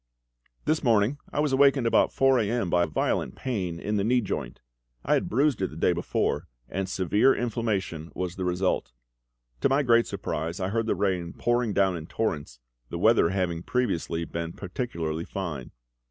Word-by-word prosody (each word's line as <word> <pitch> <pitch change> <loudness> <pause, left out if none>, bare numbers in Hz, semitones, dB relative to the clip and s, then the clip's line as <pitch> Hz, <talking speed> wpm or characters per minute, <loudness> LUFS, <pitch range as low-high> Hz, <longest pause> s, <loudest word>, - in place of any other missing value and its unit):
_ - - -37
This 155 +1 +1
morning 115 +3 +3
I - - -2
was 150 -2 +1
awakened 135 -2 +4
about 115 - +3
4 135 -1 +4
A.M. 110 -4 0
by 85 -1 +3
violent 75 - -1
pain 95 -10 -3
in 105 +3 -1
the 100 - +1
knee 125 +4 +3
joint. 95 - -4 0.5
I - - +3
had - - +1
bruised 135 -1 +2
it 95 - +1
the 75 - -11
day 85 +2 +2
before, 85 +1 -1 0.2
and 95 0 -3
severe 105 +8 +3
inflammation 105 -9 -2
was 90 -1 -3
the 95 - -4
result. 90 -6 0 0.7
To - - +2
my 140 +2 +3
great 115 -2 +4
surprise 85 +5 -3
I 95 0 -1
heard 115 +2 -1
the - - +1
rain 90 -4 -1
pouring 120 -2 +1
down 95 -2 +2
in 80 -1 -7
torrents, 75 - -3 0.3
the - - -4
weather 110 -2 +4
having 90 -3 -1
previously 90 -7 -1
been 85 0 -4
particularly 85 -6 -4
fine. 85 -10 -5
95 Hz, 180 wpm, -27 LUFS, 85-120 Hz, 0.7 s, awakened